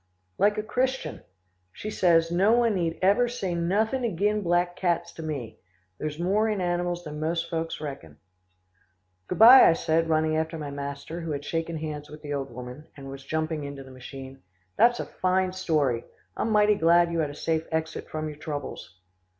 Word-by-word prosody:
"Like 205 +1 +3
a 215 - -1
Christian. 260 +4 -2 0.5
She 215 - -6
says, 165 -4 +3
'No 195 +6 +4
one 235 -2 +3
need 170 -4 -1
ever 205 +6 +4
say 200 -7 -3
nothin' 210 +9 0
agin' 210 0 +1
black 175 -1 +1
cats 170 -2 0
to - - -9
me. 145 -8 -5 0.4
There's 150 -1 -4
more 200 +6 +1
in 210 -2 -1
animals 175 -1 -1
than 150 -2 -7
most 165 +2 -2
folks 165 0 -3
reckon.'" 135 - -7 1.1
"Good - - -3
bye," 245 +4 +10
I - - +5
said 165 0 0
running 155 0 +2
after 160 +1 -1
my 150 -2 -5
master 140 +4 -6
who 165 - -5
had 145 -1 -3
shaken 165 +1 -2
hands 150 -1 -6
with 150 +1 -12
the 145 -1 -4
old 140 -1 -3
woman, 125 +5 -9
and 135 -1 -8
was 135 0 -9
jumping 155 +1 -2
into 140 -1 -7
the 130 - -13
machine. 130 +1 -10 0.3
"That's 240 0 +4
a - - -2
fine 185 0 0
story. 150 -10 0 0.3
I'm - - -1
mighty 210 -1 +4
glad 170 -2 +4
you 170 - -1
had 155 -2 0
a 145 - -8
safe 160 +1 -1
exit 160 0 -3
from 155 0 -3
your 150 -1 -7
troubles." 145 - -6
165 Hz, 190 wpm, -26 LUFS, 150-185 Hz, 1.1 s, bye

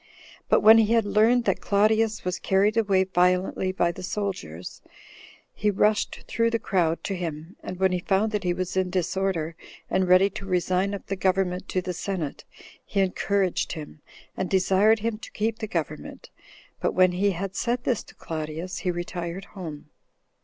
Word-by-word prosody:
But - - +4
when 220 +1 +8
he 225 0 +3
had 230 -2 +3
learned 225 +4 +3
that - - 0
Claudius 215 +1 +2
was 180 0 -2
carried 200 +3 +2
away 200 -4 +3
violently 185 0 +1
by 175 -2 +1
the - - -10
soldiers, 185 - -5 0.7
he 210 - 0
rushed 210 +1 +1
through 230 0 +1
the 230 - +1
crowd 175 -6 0
to 195 - -2
him, 165 -1 -5
and 180 - -7
when 190 -1 +3
he 180 - 0
found 195 +4 +1
that 210 -2 -2
he 180 - +1
was 185 +1 -3
in 185 -1 +1
disorder, 180 -2 -1 0.4
and 185 -1 +2
ready 185 +2 +6
to 195 - -7
resign 185 +2 +1
up 200 - -9
the 195 - -3
government 185 -1 0
to 185 - -1
the 180 0 -3
senate, 175 -5 -4 0.4
he - - -3
encouraged 195 0 0
him, 155 -2 -9 0.3
and 185 - -2
desired 195 +3 +3
him 225 -1 -2
to - - -10
keep 220 +1 -1
the 215 - -3
government; 155 -5 -5 0.5
but - - -1
when 185 0 +5
he 190 +3 +1
had 190 +2 -5
said 245 0 -1
this 240 - 0
to - - -16
Claudius, 160 +2 -5
he 185 - -2
retired 175 +1 -4
home. 155 -6 -8
190 Hz, 180 wpm, -25 LUFS, 180-205 Hz, 0.7 s, when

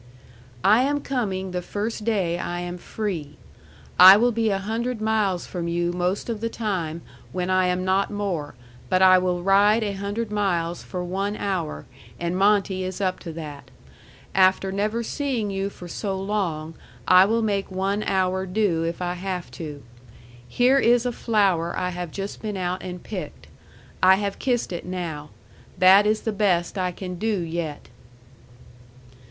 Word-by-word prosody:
I 215 +5 +5
am 290 +2 0
coming 195 -9 -2
the 180 0 -2
first 210 +4 -4
day 185 -7 0
I 175 0 -3
am 175 0 -5
free. 170 -9 -5 0.6
I 190 +2 +11
will 240 +3 +3
be 225 -1 +1
a 195 - +1
hundred 225 +4 -3
miles 215 -5 0
from 175 -2 -4
you 175 0 0
most 180 +2 -1
of 225 -3 -4
the 230 - -1
time 175 -8 -3 0.3
when 180 0 -2
I 185 0 +3
am 180 0 -1
not 190 +1 +2
more 185 -10 -3 0.3
but 185 0 +3
I 185 0 +7
will 180 -1 -1
ride 205 +3 +4
a 205 -2 -2
hundred 205 +3 -4
miles 175 -5 -1
for 180 -1 -5
one 195 +3 -2
hour 185 -6 -3 0.3
and 170 +1 -2
Monte 195 -1 +2
is 185 +1 -5
up 185 -2 -1
to 170 - -7
that. 150 -3 -8 0.6
After 190 0 +3
never 210 +4 -1
seeing 245 -6 -2
you 195 0 -2
for 180 -3 -11
so 190 +2 -3
long 180 -6 -2 0.3
I 185 +1 +7
will 225 +2 +1
make 200 -2 -1
one 195 +2 -1
hour 190 -1 0
do 185 -4 +1
if 170 +2 -3
I 175 0 -1
have 180 -1 -5
to. 150 -4 -8 0.6
Here 255 +3 +3
is 240 -1 +3
a 245 - 0
flower 195 -8 +1
I 180 0 -1
have 175 -1 -5
just 195 +5 -6
been 210 -2 -4
out 180 0 -2
and 180 -1 -7
picked. 180 -8 -7 0.6
I 185 +1 +7
have 200 0 -3
kissed 245 -7 0
it 175 - -5
now. 170 -5 -5 0.5
That 195 +3 +7
is 215 0 +1
the 220 - -2
best 190 -4 +1
I 185 -2 -1
can 180 0 -7
do 215 -3 0
yet. 165 -5 -5
190 Hz, 170 wpm, -24 LUFS, 175-210 Hz, 0.6 s, I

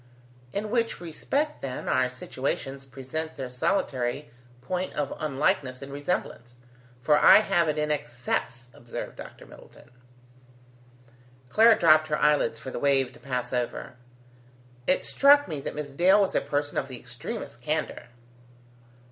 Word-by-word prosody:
"In 210 +1 -3
which 230 -1 0
respect, 275 - -2
then, 130 -2 -5
our 130 0 +2
situations 135 +1 -4
present 135 +5 -5
their 130 -2 -6
solitary 125 -2 -1 0.3
point 180 +9 -3
of 145 -2 -2
unlikeness 140 -2 0
in 135 - -9
resemblance, 140 -4 -4 0.5
for 150 +1 +4
I - - +9
have 175 -6 +2
it 155 - 0
in 150 0 0
excess," 125 -3 -3
observed 120 - -8
Dr. - - -11
Middleton. - - -16 1.6
Clara 225 - +6
dropped 155 -2 +5
her 150 -1 0
eyelids 150 -1 +2
for 130 - -8
the - - -4
wave 135 -2 +2
to - - -15
pass 125 -1 -4
over. 125 +2 -3 0.9
"It 185 - +2
struck 285 +1 +5
me 155 -5 -4
that - - -5
Miss 150 -1 -5
Dale 185 +7 +5
was 195 - +1
a - - +2
person 145 0 -1
of 135 - -4
the 130 -3 -7
extremest - - -7
candour." - - -2
145 Hz, 145 wpm, -27 LUFS, 130-170 Hz, 1.6 s, I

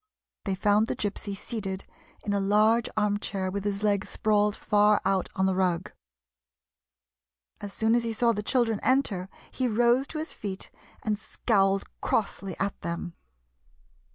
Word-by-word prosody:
They 195 -2 0
found 205 +3 +3
the - - -2
Gypsy 200 -1 -3
seated 195 -4 -4 0.4
in 205 - 0
a 200 - +2
large 215 +4 +3
arm 210 -1 +2
chair 190 -3 -3
with 200 0 -3
his 200 0 -2
legs 205 -1 +1
sprawled 210 -1 +2
far 210 0 +3
out 190 -1 +1
on 190 - +2
the 190 - +2
rug. 185 -2 0 1.7
As 205 - -6
soon 220 +2 +1
as 240 0 +3
he 230 - -2
saw 230 +2 +2
the 210 -2 -2
children 225 -1 +1
enter 215 -9 +1 0.2
he 255 - 0
rose 240 +4 +3
to 315 - -6
his 315 +2 -4
feet, 195 -2 -6 0.3
and 210 -1 0
scowled 195 -2 +1 0.2
crossly 195 -3 -1
at 195 +1 -2
them. 170 +1 -4
205 Hz, 155 wpm, -27 LUFS, 195-220 Hz, 1.7 s, found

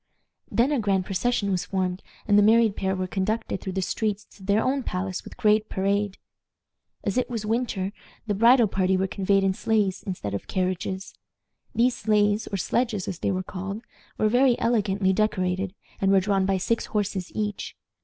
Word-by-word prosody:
Then 245 +5 +2
a 290 - +1
grand 195 -4 +1
procession 200 +1 0
was 180 -2 0
formed, 185 -1 -2 0.3
and 205 - +4
the 205 - +7
married 220 0 +5
pair 190 0 -1
were 185 0 -2
conducted 190 +2 -2
through 190 - -5
the 190 0 -1
streets 210 +1 -2
to - - -18
their 200 +3 +2
own 275 +1 +1
palace 185 -4 -3
with - - -12
great 215 0 +3
parade. 200 0 0 0.9
As 200 +4 0
it - - -2
was 230 -3 -3
winter, 215 -4 -1 0.3
the 210 - 0
bridal 235 +4 +6
party 190 -1 +1
were 190 - +1
conveyed 195 0 +1
in 190 -1 +2
sleighs 205 -2 0
instead 175 - -5
of 100 - -4
carriages. 185 0 -2 0.6
These 240 +2 +3
sleighs, 210 0 +2
or 200 - -3
sledges 220 0 -1
as 180 -3 -4
they - - 0
were 185 -1 -1
called, 195 +4 -6 0.3
were 215 - +2
very 245 +2 +4
elegantly 200 -4 +1
decorated, 190 -2 0 0.3
and 195 0 +3
were 195 - +6
drawn 195 0 +1
by 195 -1 +2
six 230 +5 -1
horses 205 -3 -2
each. 210 -2 -3
200 Hz, 185 wpm, -25 LUFS, 190-215 Hz, 0.9 s, the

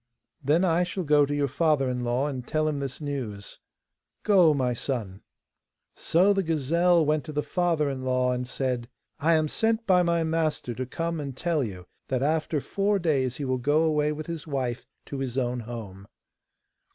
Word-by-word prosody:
'Then 155 +7 +3
I 175 0 +3
shall 180 +1 -3
go 145 -2 +4
to 145 - -2
your 145 -1 +1
father 140 0 +1
in 125 -1 -2
law 120 +3 0
and 130 -4 -4
tell 155 0 0
him 150 -2 -1
this 135 -2 -4
news.' 130 -9 -5 0.6
'Go, 185 -6 +5
my 130 -4 +1
son.' 115 -6 -4 0.7
So 185 +5 +3
the 195 - +1
gazelle 165 +1 +2
went 150 0 +1
to 155 - -6
the 150 0 -1
father 170 -4 +1
in 135 -2 -3
law 130 -1 +1
and 125 0 -2
said: 125 -2 -2 0.3
'I 165 +3 +3
am 155 -1 +2
sent 225 +7 0
by 180 -2 +4
my 170 -1 +1
master 160 -6 -1
to 130 +2 -4
come 165 +3 -3
and 140 -3 -6
tell 165 -3 0
you 95 -6 -6 0.2
that 130 0 -1
after 155 +1 0
four 200 +7 0
days 140 -8 0
he 145 - -3
will 130 -1 0
go 145 +5 +2
away 150 -2 +2
with 155 0 -5
his 165 -1 -6
wife 130 -4 -3 0.2
to 140 - -6
his 130 -2 -3
own 125 -1 0
home. 110 -4 -8
145 Hz, 190 wpm, -26 LUFS, 130-165 Hz, 0.7 s, Go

